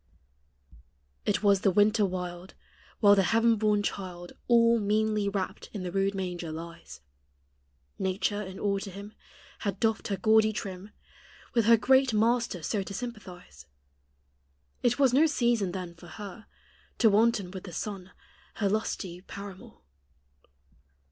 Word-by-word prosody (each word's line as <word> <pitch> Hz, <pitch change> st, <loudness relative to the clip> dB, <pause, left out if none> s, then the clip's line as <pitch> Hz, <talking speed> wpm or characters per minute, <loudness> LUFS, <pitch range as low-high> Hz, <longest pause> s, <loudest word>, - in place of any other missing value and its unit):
It -, -, +1 dB
was 200 Hz, -2 st, +4 dB
the 200 Hz, -, +4 dB
winter 210 Hz, +3 st, +3 dB
wild 180 Hz, 0 st, -6 dB, 0.5 s
While 205 Hz, -2 st, +7 dB
the 200 Hz, -, +5 dB
heaven 225 Hz, +4 st, +3 dB
born 210 Hz, -1 st, +1 dB
child 180 Hz, -3 st, -5 dB, 0.2 s
All 235 Hz, -1 st, +5 dB
meanly 215 Hz, 0 st, +1 dB
wrapt 195 Hz, -2 st, -4 dB
in 200 Hz, -4 st, -5 dB
the 180 Hz, -, -4 dB
rude 195 Hz, +1 st, 0 dB
manger 180 Hz, -3 st, -4 dB
lies 160 Hz, -, -9 dB, 1.0 s
Nature, 195 Hz, +2 st, -1 dB
in 190 Hz, -2 st, -7 dB
awe 200 Hz, -1 st, 0 dB
to 195 Hz, -, -6 dB
Him, 200 Hz, +3 st, -9 dB, 0.5 s
Had 200 Hz, -3 st, -3 dB
doffed 225 Hz, -1 st, 0 dB
her 200 Hz, -3 st, -2 dB
gaudy 220 Hz, +3 st, +4 dB
trim, 195 Hz, -1 st, -6 dB, 0.6 s
With 230 Hz, -4 st, +2 dB
her 230 Hz, +1 st, +7 dB
great 260 Hz, 0 st, +3 dB
Master 230 Hz, -5 st, +1 dB
so 205 Hz, +5 st, -1 dB
to 195 Hz, +1 st, -7 dB
sympathize; 185 Hz, -, -9 dB, 1.1 s
It 245 Hz, 0 st, +2 dB
was 270 Hz, -3 st, +4 dB
no 300 Hz, +5 st, +5 dB
season 235 Hz, -, +1 dB
then 180 Hz, -2 st, -6 dB
for 170 Hz, +1 st, -15 dB
her 205 Hz, +3 st, -9 dB, 0.5 s
To 225 Hz, -, +5 dB
wanton 210 Hz, -3 st, +2 dB
with 190 Hz, 0 st, -8 dB
the 180 Hz, -, -8 dB
sun, 190 Hz, +1 st, -5 dB, 0.5 s
her 205 Hz, -, 0 dB
lusty 195 Hz, -4 st, -2 dB
paramour. 200 Hz, 0 st, -10 dB
200 Hz, 140 wpm, -28 LUFS, 185-220 Hz, 1.1 s, While